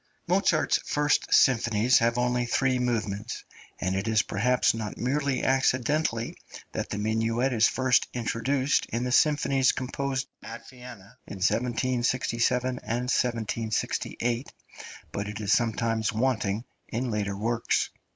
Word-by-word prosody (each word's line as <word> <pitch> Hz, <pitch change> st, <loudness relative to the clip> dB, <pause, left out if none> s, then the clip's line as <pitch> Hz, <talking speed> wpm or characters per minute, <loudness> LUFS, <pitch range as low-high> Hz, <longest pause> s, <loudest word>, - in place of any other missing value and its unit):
Mozart's -, -, +2 dB
first 150 Hz, 0 st, 0 dB
symphonies 120 Hz, -1 st, +4 dB
have 115 Hz, 0 st, +1 dB
only 125 Hz, 0 st, +1 dB
three 130 Hz, +1 st, +1 dB
movements, 110 Hz, -3 st, -2 dB, 0.4 s
and 95 Hz, 0 st, -1 dB
it 95 Hz, +3 st, -2 dB
is 110 Hz, -1 st, +3 dB
perhaps 125 Hz, +6 st, +2 dB
not 110 Hz, -2 st, -5 dB
merely 135 Hz, +1 st, -1 dB
accidentally 130 Hz, -1 st, +1 dB, 0.4 s
that -, -, -4 dB
the -, -, -3 dB
minuet 115 Hz, +4 st, 0 dB
is 110 Hz, -1 st, +4 dB
first 130 Hz, -2 st, +2 dB
introduced 130 Hz, +4 st, 0 dB
in 120 Hz, +1 st, -2 dB
the 125 Hz, -, -2 dB
symphonies 140 Hz, -2 st, +3 dB
composed 135 Hz, +1 st, -3 dB
at 115 Hz, -, -9 dB
Vienna 125 Hz, -3 st, -12 dB
in -, -, -7 dB
1767 125 Hz, +3 st, 0 dB
and 125 Hz, +2 st, -2 dB
1768, 115 Hz, +1 st, -1 dB, 0.6 s
but 100 Hz, +1 st, -3 dB
it 105 Hz, 0 st, -6 dB
is 105 Hz, -1 st, +1 dB
sometimes 115 Hz, -1 st, +1 dB
wanting 110 Hz, -2 st, 0 dB, 0.2 s
in 120 Hz, +2 st, -3 dB
later 100 Hz, -2 st, -2 dB
works. 115 Hz, +2 st, 0 dB
120 Hz, 125 wpm, -27 LUFS, 110-130 Hz, 0.6 s, symphonies